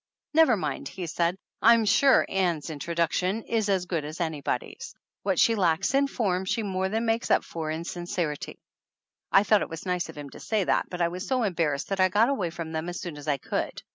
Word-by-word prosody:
"Never 315 -8 +5
mind," 150 -6 -3
he 185 -2 -6
said, 170 +2 0 0.2
"I'm 230 -1 +6
sure 260 +6 +5
Ann's 175 -5 -1
intro 160 +3 -5
THE 170 - +4
ANNALS 165 - 0
OF 180 - 0
ANN 190 - 0
duction 225 - -9
is 220 -3 0
as 190 -2 +1
good 170 -4 -2
as 155 +3 -7
anybody's. 160 - -3 0.3
What 195 -3 0
she 230 - +5
lacks 185 0 +1
in 275 +1 +3
form 195 -9 -1
she 225 +4 -1
more 190 -1 -1
than 225 +3 -1
makes 225 +1 0
up - - +4
for 160 -2 -5
in 160 +1 -3
sin 175 0 -6
cerity." 170 -7 -3 0.7
I 195 - +6
thought 210 -1 +4
it - - -3
was 165 +2 -7
nice 180 -2 -1
of 160 - -10
him 145 -2 -8
to - - -11
say 215 -3 0
that, - - +1
but 180 -1 -5
I - - +3
was 180 +3 -6
so 255 -2 +1
embarrassed 165 -8 -1
that 195 -1 -2
I 185 0 +5
got 210 +6 +3
away 200 -11 0
from 165 -1 -6
them 160 +2 -3
as 175 - -5
soon 175 -4 -6
as 145 +1 -10
I 145 -2 +2
could. - - -3
180 Hz, 250 wpm, -27 LUFS, 165-210 Hz, 0.7 s, I'm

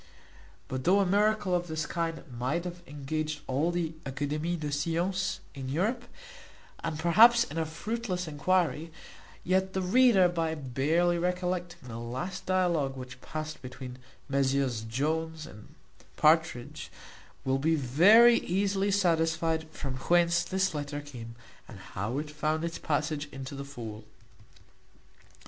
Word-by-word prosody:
But 130 0 -4
though 190 +4 +4
a 200 - +3
miracle 205 0 +2
of 175 0 0
this 160 -1 -2
kind 165 -1 -3
might 130 +7 -2
have 175 0 -6
engaged 150 +1 -3
all 140 +6 0
the 175 -2 -1
Académies 150 +5 -2
des 150 -1 -3
Sciences 170 +6 -1
in 135 -2 -6
Europe, 215 - 0 0.8
and 165 -2 -2
perhaps 225 +9 +6
in 165 -8 -5
a 160 - -1
fruitless 185 +1 -3
enquiry; 165 +1 0 0.5
yet 190 +1 +1
the 190 - 0
reader, 200 -1 +5
by 165 -2 -1
barely 155 +6 +1
recollecting 180 -3 -2
the 115 -1 -6
last 130 +11 -5
dialogue 170 -8 +1
which 125 0 -9
passed 155 0 -6
between 130 0 -8 0.3
Messieurs 135 -4 +1
Jones 155 +7 -2
and 105 - -14 0.4
Partridge, 155 -6 +2 0.5
will 135 0 +1
be 160 +3 +2
very 195 - +6
easily 195 +2 0
satisfied 165 -4 +1
from 135 -4 -5
whence 170 +4 +3
this 190 -1 0
letter 145 -1 -4
came, 120 -5 -9 0.3
and 115 - -11
how 95 +6 -4
it 150 +1 -4
found 155 +2 -1
its 170 - -4
passage 150 -1 -1
into 135 0 -7
the 140 0 -5
fowl. 115 -6 -8
160 Hz, 135 wpm, -29 LUFS, 140-180 Hz, 0.8 s, perhaps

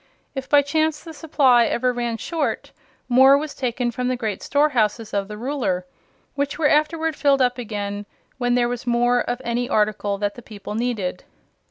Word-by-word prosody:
If 265 -1 -6
by 290 -1 +5
chance 310 +1 0
the 325 - -9
supply 275 -6 +3
ever 250 +1 0
ran 240 -1 -2
short, 320 +5 -3 0.4
more 265 +2 +6
was 300 0 -4
taken 245 -1 -2
from 250 +2 -3
the 255 - 0
great 220 -5 -3
storehouses 230 -7 +1
of 200 -1 -1
the 210 0 -8
Ruler, 235 -8 -2 0.5
which 285 0 -2
were 310 - +3
afterward 315 +1 +1
filled 280 -1 +3
up 250 -1 +1
again 205 -3 -4 0.3
when 245 -1 +1
there 240 -1 +2
was 245 0 -5
more 240 +1 +3
of 245 0 -3
any 240 +1 -1
article 210 -1 0
than 205 0 -1
the 245 - -11
people 210 -2 -9
needed. 215 -6 -2
245 Hz, 180 wpm, -22 LUFS, 220-280 Hz, 0.5 s, more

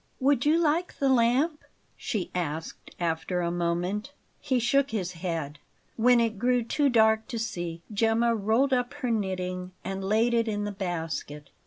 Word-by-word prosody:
"Would 275 0 +2
you 310 +2 +5
like 335 +2 0
the 275 - +1
lamp?" 265 +6 +2 0.3
she 205 -6 -3
asked 160 -2 -4
after 170 +1 -1
a 170 0 -1
moment. 175 +8 -2 0.3
He 260 -3 0
shook 275 +4 +2
his 190 -5 -2
head. 165 -4 -4 0.4
When 245 +1 +5
it 225 -3 0
grew 245 +1 +2
too 285 +5 +1
dark 220 -2 +3
to 235 - -4
see, 175 -6 -4
Gemma 225 +2 +2
rolled 225 +6 +2
up 250 +2 0
her 255 -4 -2
knitting 185 -3 -2
and 195 0 -4
laid 220 +5 +2
it 230 -1 +2
in 205 -1 -1
the 205 - -2
basket. 165 -6 -4
220 Hz, 165 wpm, -27 LUFS, 180-245 Hz, 0.4 s, you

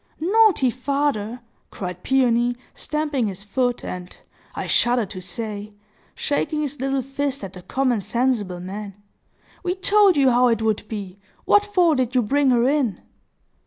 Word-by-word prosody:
"Naughty 370 - +4
father!" 255 -3 -1 0.3
cried 180 -2 -6
Peony, 245 -1 +2 0.2
stamping 295 -5 -1
his 200 0 -5
foot, 245 +3 -1
and—I 180 0 -9
shudder 240 -1 +2
to 185 -1 -8
say—shaking 210 - -4
his 290 -1 -3
little 270 0 0
fist 275 -1 -3
at 190 -1 -7
the 180 - -10
common 255 +1 0
sensible 225 -6 -1
man. 195 +2 -7 0.7
"We 360 0 -1
told 395 -2 +4
you 270 -2 +5
how 245 +1 +4
it 230 -2 +1
would 215 -1 0
be! 200 -3 -6 0.3
What 410 - +5
for 365 -5 +3
did 260 -2 -1
you 250 - +4
bring 280 +5 +2
her 245 -1 +3
in?" 265 -9 +1
245 Hz, 145 wpm, -22 LUFS, 210-285 Hz, 0.7 s, you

